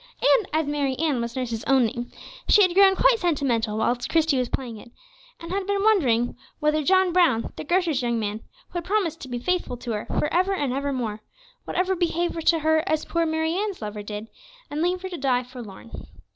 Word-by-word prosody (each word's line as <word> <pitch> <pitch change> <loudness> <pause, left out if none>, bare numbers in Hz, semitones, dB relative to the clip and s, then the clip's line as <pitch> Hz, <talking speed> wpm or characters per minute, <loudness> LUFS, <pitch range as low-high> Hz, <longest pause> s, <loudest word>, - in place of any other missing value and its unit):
And - - +3
as 315 0 +1
Mary 285 -2 -1
Ann 300 -6 0
was 235 0 -4
nurse's 235 -3 -3
own 265 -2 +4
name, 240 +2 -4 0.4
she 415 - +7
had 365 -2 +2
grown 385 0 +6
quite - - +4
sentimental 260 - 0
whilst 240 +2 0
Christie 320 -4 +2
was 250 -2 -1
playing 240 -4 -4
it, 235 - -13 0.5
and 335 +1 -8
had 390 0 -2
been 400 0 0
wondering 255 - +3 0.2
whether 300 +1 +2
John 375 +3 +3
Brown, 330 -11 +2
the - - -6
grocer's 340 -4 +1
young 235 -1 0
man, 210 0 -3 0.3
who 350 - -3
had - - -8
promised 370 -5 0
to - - -7
be 245 -1 -4
faithful 350 -2 -1
to 240 0 -6
her 210 -1 -3
for - - 0
ever 370 +3 +2
and 285 -8 -1
ever 280 +1 -1
more, 225 -5 -3 0.5
would - - -5
ever 375 +1 +1
behave 345 0 0
to 330 - +4
her 315 0 +3
as 310 -1 0
poor 335 -1 0
Mary 320 +1 0
Ann's 400 +1 -2
lover 210 -1 -5
did, 210 +1 -6 0.4
and 295 +1 -2
leave 360 +2 0
her 375 - -4
to 355 - -6
die 255 -2 +1
forlorn. 225 - -11
300 Hz, 215 wpm, -24 LUFS, 240-360 Hz, 0.5 s, she